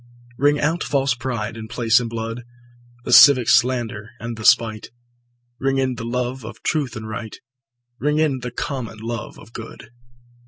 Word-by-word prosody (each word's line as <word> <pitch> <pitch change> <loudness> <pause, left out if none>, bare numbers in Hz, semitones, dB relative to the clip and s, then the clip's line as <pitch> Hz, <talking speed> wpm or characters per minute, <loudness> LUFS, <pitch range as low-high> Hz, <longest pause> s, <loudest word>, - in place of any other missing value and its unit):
Ring 145 +2 +3
out 160 +4 0
false 135 -2 +1
pride 120 -4 -4
in 110 -1 -8
place 115 0 +3
and 120 -2 -4
blood, 115 +1 -5 0.6
The - - 0
civic 130 -5 +8
slander 120 -4 +1
and 115 0 -5
the 110 - -9
spite; 110 -1 +3 0.7
Ring 135 0 0
in 130 -1 +1
the 115 - -7
love 125 +1 -3
of 110 +1 -10
truth 145 -7 -1
and 110 -1 -6
right, 110 0 -6 0.6
Ring 150 +1 +1
in 150 -4 +1
the 125 0 -5
common 120 -2 -5
love 115 +2 -6
of 115 - -15
good. 115 -1 -10
120 Hz, 165 wpm, -21 LUFS, 115-135 Hz, 0.7 s, civic